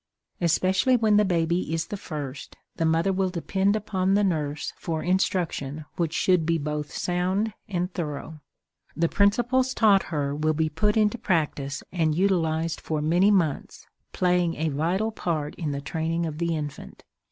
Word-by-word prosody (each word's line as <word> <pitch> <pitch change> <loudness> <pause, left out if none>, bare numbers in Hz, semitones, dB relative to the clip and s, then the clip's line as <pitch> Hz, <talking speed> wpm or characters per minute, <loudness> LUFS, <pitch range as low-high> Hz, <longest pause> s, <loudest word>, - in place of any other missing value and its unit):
Especially 185 +8 +3
when 215 -2 +3
the 210 - +5
baby 170 -2 0
is 165 0 -1
the - - -5
first, 145 -8 -7 0.2
the 165 - +1
mother 165 +4 +2
will 190 0 +1
depend 190 +3 0
upon 195 -2 0
the 205 - +3
nurse 150 -6 -1
for 160 -2 -3
instruction 175 -6 -1
which 170 -3 -1
should 180 0 +2
be 165 +1 +1
both 150 -1 -3
sound 185 +4 -1 0.2
and 180 -1 -2
thorough. 155 -1 -5 0.6
The 170 +1 +3
principles 245 +7 +2
taught 205 -4 +5
her 145 -3 -1
will 155 +1 0
be 160 0 +1
put 210 +8 +1
into 215 +2 +2
practice 150 -8 -1
and 160 -4 +1
utilized 165 -3 +1
for 155 -1 -2
many 175 +6 +3
months, 175 -8 0 0.3
playing 180 -2 +1
a 160 +1 -1
vital 175 +10 0
part 155 -8 -2
in 160 -5 -4
the 140 0 -3
training 165 +3 -2
of 155 -1 -5
the 170 -1 0
infant. 145 - -7
170 Hz, 165 wpm, -25 LUFS, 155-190 Hz, 0.6 s, the